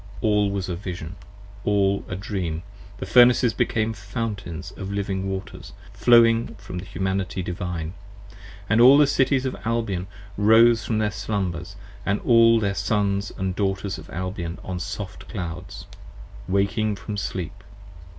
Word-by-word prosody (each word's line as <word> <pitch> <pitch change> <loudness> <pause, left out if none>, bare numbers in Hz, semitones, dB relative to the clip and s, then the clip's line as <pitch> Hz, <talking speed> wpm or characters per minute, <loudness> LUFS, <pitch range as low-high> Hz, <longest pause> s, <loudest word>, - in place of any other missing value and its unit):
All 105 -2 +2
was 100 -2 -3
a 90 - -2
Vision, 90 -2 -6 0.5
all 100 -1 +2
a 90 - -4
Dream: 90 -4 -3 0.3
the - - -5
Furnaces 120 -1 +5
became 110 0 0
Fountains 100 -4 -5
of 95 +1 -7
Living 95 -1 -2
Waters, 95 0 -6 0.2
flowing 115 -1 +4
from 90 - -7
the 90 - -8
Humanity 95 -1 -2
Divine. 85 -2 -4 0.7
And 110 +3 +3
all 130 +3 +9
the 150 - +6
Cities 135 -1 +2
of 130 - -2
Albion 110 -6 -1 0.3
rose 110 +2 +5
from 110 - -1
their 105 -1 +1
Slumbers, 90 -5 -3 0.3
and 100 +2 0
All 115 -1 +5
The 100 -3 0
Sons 100 -1 0
& 95 -1 -2
Daughters 95 -1 -1
of - - -13
Albion 90 -1 -4
on 90 -1 -4
soft 95 0 -6
clouds, 90 -3 -6 0.6
Waking 100 +2 +1
from 105 +1 -6
Sleep. 95 -1 -5
100 Hz, 140 wpm, -24 LUFS, 95-110 Hz, 0.7 s, all